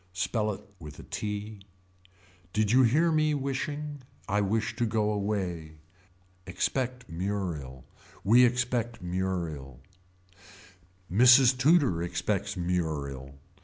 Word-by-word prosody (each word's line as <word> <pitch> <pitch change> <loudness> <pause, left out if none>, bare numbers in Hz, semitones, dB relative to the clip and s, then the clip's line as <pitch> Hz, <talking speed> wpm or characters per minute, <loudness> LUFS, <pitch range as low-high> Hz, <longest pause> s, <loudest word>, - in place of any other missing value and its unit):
Spell 105 +4 -1
it 100 +1 -12
with 75 -2 -10
a - - -10
t. 105 0 -5 0.9
Did 105 0 +1
you 130 +2 +6
hear 150 +8 +3
me 155 -1 +2
wishing. 145 +1 -4 0.3
I 105 +1 +1
wish 105 +2 -1
to 120 - +1
go 105 -1 0
away. 95 -6 -3 0.7
Expect 125 +7 -2
Muriel. 85 -8 -4 0.4
We 120 +5 +6
expect 120 -2 0
Muriel 85 -8 -3 1.3
Mrs. 125 +3 +7
Tudor 135 - +3
expects 95 +4 -2
Muriel. 75 -7 -3
105 Hz, 105 wpm, -28 LUFS, 85-125 Hz, 1.3 s, Mrs